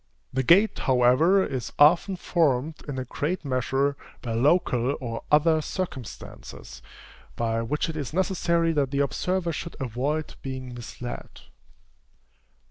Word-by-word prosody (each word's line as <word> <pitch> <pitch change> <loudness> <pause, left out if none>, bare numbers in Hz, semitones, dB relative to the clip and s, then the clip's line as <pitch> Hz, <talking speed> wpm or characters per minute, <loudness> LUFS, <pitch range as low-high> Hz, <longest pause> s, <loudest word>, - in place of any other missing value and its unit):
The 130 - +1
gait, 190 - +4
however, 130 +10 +4
is 130 -4 -4
often 170 +6 +5
formed, 155 -4 +1
in 140 -2 -4
a 130 - -3
great 155 +7 -3
measure, 135 +2 0 0.3
by 115 - -3
local 135 0 +2
or 115 -3 -5
other 155 +1 +4
circumstances, 155 - -7 0.5
by 115 -1 0
which 150 +9 -1
it 160 - -5
is 145 -5 -4
necessary 170 -2 +1
that 145 -3 +1
the 140 - -3
observer 175 +5 -1
should 170 +3 -6
avoid 135 +5 -2
being 130 -2 -6
misled. 120 0 -8
145 Hz, 130 wpm, -26 LUFS, 125-170 Hz, 0.5 s, often